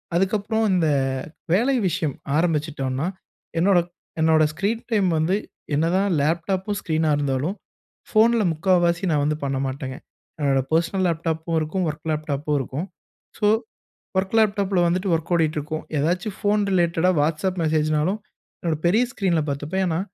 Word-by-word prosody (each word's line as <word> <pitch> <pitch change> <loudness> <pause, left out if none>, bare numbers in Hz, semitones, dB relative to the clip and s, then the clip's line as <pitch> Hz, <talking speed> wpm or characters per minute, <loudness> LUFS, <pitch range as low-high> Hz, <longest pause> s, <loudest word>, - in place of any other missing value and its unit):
அதுக்கப்புறம் 210 +4 +1
இந்த 175 -3 +2 0.7
வேலை 240 +9 +3
விஷயம் 165 -6 -1 0.2
ஆரம்பிச்சுட்டோன்னா, 150 -4 0 0.5
என்னோட 190 +2 +4 0.4
என்னோட 160 0 +4
ஸ்க்ரீன் 205 +8 -1
டைம் 205 -4 +3
வந்து, 160 +5 +2 0.4
என்னதான் 175 +6 +2
லேப்டாப்பும் 185 +6 0
ஸ்க்ரீனா 160 -1 0
இருந்தாலும், 145 +5 -1 0.5
ஃபோன்ல 225 +1 +4
முக்கால்வாசி 175 +2 +2
நான் 145 -2 +2
வந்து 150 0 0
பண்ண 135 -1 -1
மாட்டேங்க. 130 0 -5 0.4
என்னோட 140 -2 +2
பெர்சனல் 170 +4 +1
லேப்டாப்பும் 165 0 -1
இருக்கும். 165 +4 -1
ஒர்க் 155 +1 -7
லேப்டாப்பும் 150 -1 -1
இருக்கும். 135 +5 -4 0.5
ஸோ, - - +1 0.7
வொர்க் 190 +3 +1
லேப்டாபல 200 -4 +2
வந்துவிட்டு 180 +2 0
ஒர்க் 165 +2 -6
ஓடிட்டிருக்கும். 155 -1 -1
ஏதாச்சு 175 +8 0
ஃபோன் 210 +1 +2
ரிலேட்டடா 175 -1 +2
WhatsApp 160 +5 0
மெசேஜ்னாலும், 155 +4 +1 0.4
என்னோட 165 -2 -1
பெரிய 215 +8 +4
ஸ்கிரீன்ல 180 -9 +1
பார்த்துப்பேன். 150 +7 -2
ஏன்னா, 165 -1 0
165 Hz, 130 wpm, -23 LUFS, 155-190 Hz, 0.7 s, என்னோட